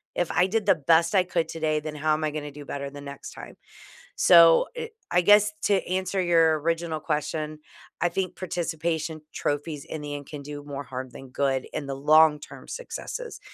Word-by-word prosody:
If 175 Hz, -, 0 dB
I 175 Hz, -, +3 dB
did 215 Hz, +1 st, -1 dB
the 195 Hz, -, +6 dB
best 165 Hz, +4 st, +3 dB
I 185 Hz, -, +5 dB
could 175 Hz, -2 st, -1 dB
today, 155 Hz, -1 st, -1 dB
then 150 Hz, 0 st, -6 dB
how 155 Hz, +1 st, +1 dB
am 155 Hz, +1 st, -1 dB
I 155 Hz, -, 0 dB
gonna 150 Hz, -1 st, -5 dB
do 145 Hz, 0 st, -11 dB
better 140 Hz, 0 st, -5 dB
the 145 Hz, +1 st, -10 dB
next 140 Hz, -1 st, -9 dB
time?" -, -, -10 dB, 0.6 s
So, 170 Hz, -2 st, +7 dB
er, 465 Hz, -1 st, -4 dB, 0.2 s
I 180 Hz, -, +3 dB
guess 210 Hz, +3 st, +6 dB
to 205 Hz, -, +3 dB
answer 185 Hz, +1 st, -1 dB
your 165 Hz, -3 st, +4 dB
original 165 Hz, 0 st, -1 dB
question, 155 Hz, 0 st, -3 dB, 0.4 s
I 175 Hz, -, +3 dB
think 185 Hz, +1 st, -3 dB
participation 165 Hz, -3 st, -3 dB
trophies 145 Hz, 0 st, -3 dB
in 155 Hz, -, -7 dB
the 145 Hz, 0 st, -5 dB
end 145 Hz, -1 st, -7 dB
can 145 Hz, -1 st, -8 dB
do 145 Hz, 0 st, -7 dB
more 140 Hz, -1 st, -6 dB
harm 130 Hz, -1 st, -6 dB
than 135 Hz, +2 st, -11 dB
good 135 Hz, 0 st, 0 dB
in 150 Hz, -2 st, -4 dB
the 135 Hz, -1 st, -4 dB
long-term 150 Hz, +1 st, +3 dB
successes. -, -, -6 dB
155 Hz, 195 wpm, -26 LUFS, 145-175 Hz, 0.6 s, So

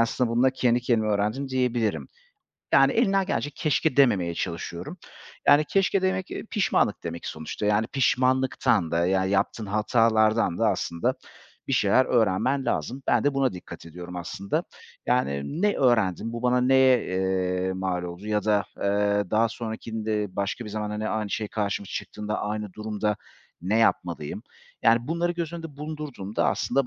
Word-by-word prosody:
aslında 115 Hz, +1 st, +1 dB
bununla 125 Hz, +3 st, +3 dB
kendi 125 Hz, -2 st, +1 dB
kendime 115 Hz, -3 st, +1 dB
öğrendim 110 Hz, +7 st, -1 dB
diyebilirim. 125 Hz, -4 st, 0 dB, 0.6 s
Yani, -, -, +6 dB
elimden 195 Hz, 0 st, +3 dB
geldiğince 145 Hz, -6 st, -1 dB
keşke 150 Hz, 0 st, 0 dB
dememeye 95 Hz, -11 st, +3 dB
çalışıyorum. 85 Hz, -, -5 dB, 0.5 s
Yani, 145 Hz, +1 st, +6 dB
keşke 195 Hz, +3 st, +1 dB
demek, 185 Hz, 0 st, -1 dB
eee, -, -, -5 dB
pişmanlık 195 Hz, -, +1 dB
demek 85 Hz, 0 st, -5 dB
sonuçta, 80 Hz, +6 st, -5 dB
yani, 105 Hz, +2 st, +2 dB
pişmanlıktan 130 Hz, -, +1 dB
da, 85 Hz, +1 st, +1 dB
yani, 95 Hz, 0 st, +1 dB
yaptığın 100 Hz, +2 st, 0 dB
hatalardan 110 Hz, -1 st, +2 dB
da -, -, +3 dB
aslında 85 Hz, 0 st, -1 dB, 0.5 s
bir -, -, -1 dB
şeyler 130 Hz, -, +4 dB
öğrenmen 120 Hz, +5 st, +1 dB
lazım. 135 Hz, +1 st, -2 dB
Ben -, -, +2 dB
de 145 Hz, -1 st, +2 dB
buna 135 Hz, -2 st, +1 dB
dikkat 90 Hz, -2 st, -10 dB
ediyorum 90 Hz, +2 st, -9 dB
aslında. 100 Hz, -, -3 dB, 0.4 s
Yani, 125 Hz, -, 0 dB
ne 210 Hz, 0 st, +3 dB
öğrendim, 115 Hz, -, +2 dB
bu 115 Hz, 0 st, -5 dB
bana 125 Hz, 0 st, +3 dB
neye, 130 Hz, -1 st, +4 dB
eee, 95 Hz, 0 st, -1 dB
mal 95 Hz, -1 st, -2 dB
oldu 90 Hz, +3 st, -7 dB
ya 105 Hz, -2 st, 0 dB
da, 105 Hz, -1 st, +2 dB
eee, 100 Hz, -1 st, 0 dB
daha 115 Hz, +2 st, +3 dB
sonrakinde 110 Hz, -3 st, -4 dB
başka 100 Hz, +4 st, -2 dB
bir 105 Hz, -, -7 dB
zamanda 105 Hz, 0 st, -3 dB
ne 110 Hz, 0 st, -2 dB
aynı 110 Hz, -2 st, -2 dB
şey 105 Hz, -1 st, -2 dB
karşımıza 100 Hz, -2 st, -3 dB
çıktığında 105 Hz, 0 st, -4 dB
aynı 105 Hz, -1 st, -3 dB
durumda 105 Hz, 0 st, -2 dB, 0.5 s
ne 100 Hz, +5 st, +1 dB
yapmalıyım? 85 Hz, -9 st, 0 dB, 0.4 s
Yani, 115 Hz, 0 st, +5 dB
bunları 170 Hz, +2 st, 0 dB
göz 170 Hz, -2 st, -4 dB
önünde 165 Hz, -4 st, -8 dB
bulundurduğumda 150 Hz, -9 st, -3 dB
aslında 140 Hz, -2 st, 0 dB
110 Hz, 155 wpm, -25 LUFS, 100-130 Hz, 0.6 s, Yani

